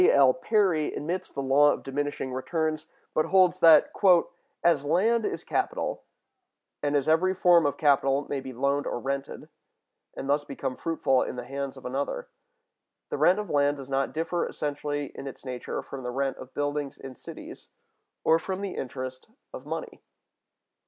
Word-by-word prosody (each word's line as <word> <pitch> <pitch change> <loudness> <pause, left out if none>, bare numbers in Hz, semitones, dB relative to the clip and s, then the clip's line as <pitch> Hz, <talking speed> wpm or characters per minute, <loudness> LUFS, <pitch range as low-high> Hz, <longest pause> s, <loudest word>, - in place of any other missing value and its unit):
L. 135 -2 +6
Perry(184) 180 - +1
admits 175 +5 -3
the 140 - -4
law 145 +2 +5
of - - -4
diminishing 135 -1 -3
returns, 155 +3 -2 0.3
but 155 - +1
holds 185 -1 +4
that, 165 -3 +7 0.7
"as 165 -5 +3
land 210 +9 +2
is - - -4
capital, - - -2 0.8
and 145 0 0
as 140 -2 +1
every 180 +4 +3
form 175 -4 +5
of 145 0 -2
capital 140 -2 +3
may 140 - -2
be 130 0 -7
loaned 140 +3 0
or - - -2
rented, 135 +2 -4 0.7
and 135 - -5
thus 145 +1 +2
become 135 -2 -4
fruitful 135 -5 +1
in - - -3
the 125 -1 -6
hands 140 +1 -5
of 130 - -12
another, 140 - -3 0.8
the - - -3
rent 180 +2 +5
of 210 -4 -4
land 145 0 +2
does 135 0 -9
not 135 0 0
differ 165 +2 -1
essentially 145 -1 -3
in 140 - -8
its 135 - -9
nature 125 -1 -4
from 135 - -8
the 125 - -4
rent 135 +2 -1
of 130 - -10
buildings 145 -1 -2
in 135 -1 -9
cities, - - -10 0.6
or 160 +1 +4
from 190 +3 -4
the 200 -2 -3
interest 130 0 -6 0.3
of - - -9
money." - - -5
145 Hz, 170 wpm, -27 LUFS, 135-165 Hz, 0.8 s, that